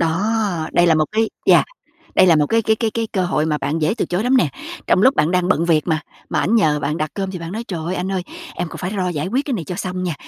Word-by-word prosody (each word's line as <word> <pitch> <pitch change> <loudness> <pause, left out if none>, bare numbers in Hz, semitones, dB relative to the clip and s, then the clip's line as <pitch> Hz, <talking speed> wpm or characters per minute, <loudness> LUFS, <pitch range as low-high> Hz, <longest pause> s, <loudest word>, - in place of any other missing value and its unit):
Đó! 185 0 0
Đây 175 0 +4
là 165 - +5
một 155 -1 +3
cái 220 0 +1 0.2
yeah, - - +6 0.5
đây 185 - +6
là 170 -3 +6
một 150 - +2
cái 225 +5 +2
cái 220 +1 +2 0.2
cái 230 -1 -1
cơ 185 -3 +1
hội 155 -3 0
mà 150 -1 0
bạn 150 +3 -2
dễ 155 +6 +1
từ - - -1
chối 180 +4 -1
lắm 260 +1 +3
nè. 200 - +3 0.4
Trong 185 - +3
lúc 265 +4 +5
bạn 150 +3 +2
đang 180 0 +1
bận 170 - +2
việc 165 -2 +2
mà, 160 -2 0 0.3
mà - - +1
anh 225 - +1
nhờ 155 -9 +3
bạn 150 +2 -2
đặt 155 -1 -2
cơm 195 -1 -3
thì 185 - -6
bạn 165 +1 -7
nói: 225 +3 -4
"Trời 175 -4 -4
ơi, 180 - -2
anh 190 +1 -3
ơi, 185 -2 -1 0.3
em 175 -1 -3
còn - - -9
phải 180 - -3
lo 185 -3 -1
giải 155 -3 -2
quyết 255 +9 -1
cái 270 - -2
này 175 - -3
cho 180 - -5
xong 185 0 -4
nha. 175 -3 -2
180 Hz, 305 wpm, -20 LUFS, 160-205 Hz, 0.5 s, yeah